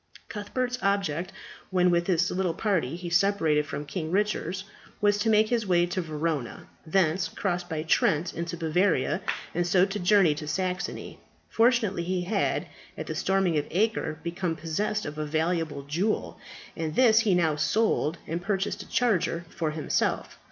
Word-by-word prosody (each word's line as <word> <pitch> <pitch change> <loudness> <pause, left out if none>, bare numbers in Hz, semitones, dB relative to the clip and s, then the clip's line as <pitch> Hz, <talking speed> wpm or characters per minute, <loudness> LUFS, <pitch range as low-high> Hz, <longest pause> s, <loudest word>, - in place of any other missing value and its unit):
Cuthbert's 250 +4 -3
object, 190 -3 0 0.4
when 180 -1 +3
with 170 0 +1
his 180 -1 +2
little 180 -2 -1
party 175 - 0
he 175 0 -6
separated 170 -5 +2
from 150 -1 -5
King 160 +1 -4
Richard, 190 -1 -1 0.4
was 205 0 +3
to 225 - +1
make 215 0 +4
his 230 -4 0
way 175 -1 +4
to 180 +1 -2
Verona, 155 -5 -3 0.2
thence 180 +1 +2
cross 180 -3 -2
by 160 -3 -4
Trent 160 +1 +2
into 170 +1 -4
Bavaria, 165 0 +1 0.3
and 175 +1 0
so 180 +1 +4
to 200 +1 -4
journey 180 -3 +4
to 150 0 -7
Saxony. 185 +2 -3 0.3
Fortunately 225 -6 +3
he 180 +1 -1
had, 195 +2 0 0.3
at - - -4
the - - -4
storming 190 -5 +1
of 145 - -4
Acre, 190 -5 0
become 170 0 -2
possessed 185 +7 -2
of 150 +1 -6
a 155 - -1
valuable 160 -2 -1
jewel, 175 +10 -1 0.4
and 160 -2 -3
this 225 -4 +6
he 215 -5 +3
now 160 -4 +2
sold, 165 0 +1
and 170 +2 -3
purchased 195 +1 -1
a - - -12
charger 205 -8 +1
for 160 -2 -2
himself. 155 -1 -1
180 Hz, 165 wpm, -27 LUFS, 160-200 Hz, 0.4 s, this